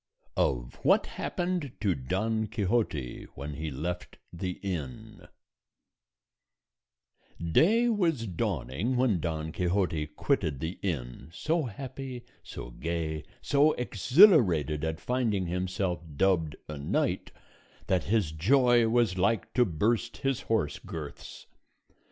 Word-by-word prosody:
OF - - 0
WHAT - - +4
HAPPENED 175 -7 -3
TO 100 -4 +2
DON 110 - -1
QUIXOTE 100 - -1
WHEN 75 +1 -6
HE 80 +2 -4
LEFT 85 +6 -5 0.2
THE 90 +1 -3
INN 75 -10 -5 2.1
Day 175 - +4
was 170 - +1
dawning 90 - -2
when 120 -8 +2
Don 80 -1 -3
Quixote 90 -3 0
quitted 80 - -1
the 80 +5 -4
inn, 65 -7 -4
so 155 - 0
happy, 130 +2 -7 0.2
so - - -8
gay, 80 +2 -3 0.2
so 145 +2 +4
exhilarated 115 - +5
at 80 0 -2
finding 115 -7 0
himself 90 0 -2
dubbed 85 -4 +2
a 75 -1 -6
knight, 70 - 0 0.6
that 95 -2 +1
his 100 -6 +1
joy 120 - +4
was 115 -6 +2
like 110 +5 +1
to 125 -1 +4
burst 105 +6 0
his 135 -1 -1
horse 85 -9 0
girths. 75 -3 -8
95 Hz, 115 wpm, -29 LUFS, 80-120 Hz, 2.1 s, exhilarated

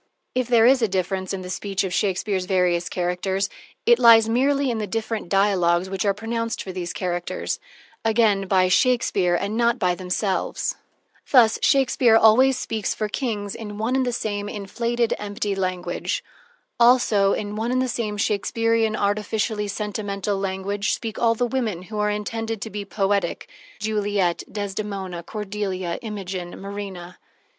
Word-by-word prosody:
If 255 -2 0
there 235 -2 +5
is 260 +1 +5
a 225 - +3
difference 190 0 -2
in 190 -1 -4
the 180 - -7
speech 195 +1 -2
of 185 -2 -3
Shakespeare's 190 0 0
various 180 -2 +1
characters, 185 +2 -1 0.3
it 240 +1 +5
lies 230 -2 +7
merely 275 +3 +2
in 225 - -2
the 210 - -3
different 220 -2 -3
dialogs 190 -2 +2
which 195 +1 -2
are 200 - +3
pronounced 230 +1 -3
for 190 - -6
these 180 -2 -4
characters 180 -3 -3 0.4
again 220 -3 +2
by 185 -1 +3
Shakespeare 195 -4 +2
and 200 +4 -2
not 235 0 +2
by 180 -1 +1
themselves. 185 +2 -1 0.6
Thus 235 -5 +5
Shakespeare 255 -4 +4
always 255 +4 +5
speaks 220 -4 -2
for 215 -1 -2
kings 210 -5 -3
in 210 -2 -7
one 225 +4 0
and 265 - +2
the 250 - 0
same 205 -3 -3
inflated, 235 +4 -1
empty 205 0 -3
language. 185 -2 -2 0.6
Also 235 -5 +5
in 205 0 -3
one 225 +3 -1
and 255 - +1
the 255 - +1
same 215 -4 -2
Shakespearian, 225 +2 +1
artificially 210 +1 -1
sentimental 200 -1 -3
language 195 +1 -1
speak 225 -2 -6
all 230 -1 +3
the 245 - +1
women 230 -8 -2
who 215 +3 -6
are 210 0 +2
intended 225 +1 -3
to 220 - -7
be 205 0 -5
poetic: 195 -3 -1 0.3
Juliet, 205 -4 0
Desdemona, 200 -3 -4
Cordelia, 195 -2 -4
Imogen, 190 -5 -6
Marina. 195 -3 -7
205 Hz, 155 wpm, -23 LUFS, 190-225 Hz, 0.6 s, lies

